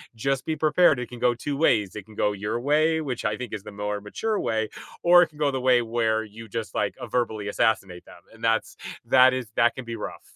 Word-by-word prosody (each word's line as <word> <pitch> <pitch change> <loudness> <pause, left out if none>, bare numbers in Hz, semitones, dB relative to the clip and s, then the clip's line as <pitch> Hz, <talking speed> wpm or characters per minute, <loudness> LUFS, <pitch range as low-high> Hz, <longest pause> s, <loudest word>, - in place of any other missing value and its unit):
just 135 +3 -1
be 160 - -1
prepared, 155 -2 +3
it 125 - -5
can 125 - -9
go 120 -1 +3
2 140 +4 -4
ways, 105 - +2
it 100 -2 -7
can 110 - -16
go 105 - +1
your 105 +4 -3
way, 155 +4 +2
which 130 -5 -4
I 105 0 0
think 125 -3 -7
is 105 -2 -5
the 105 - -9
more 105 0 -4
mature 210 - -2
way, 110 -1 -1 0.3
or 175 0 +7
it - - -1
can 150 -1 -19
go 145 -2 +2
the 130 -1 -3
way 125 -1 +4
where 115 -1 0
you 110 +1 -11
just, 115 +1 -5
like, 105 - -1
a 125 - -5
verbally 110 -4 -2
assassinate 95 -4 0
them, - - -15
and 115 - -17
that's 115 0 +1 0.3
that 130 0 +6
is 130 -3 -3
that 120 0 +3
can 130 -2 -7
be 115 0 -5
rough. 105 - -7
120 Hz, 250 wpm, -25 LUFS, 110-135 Hz, 0.3 s, or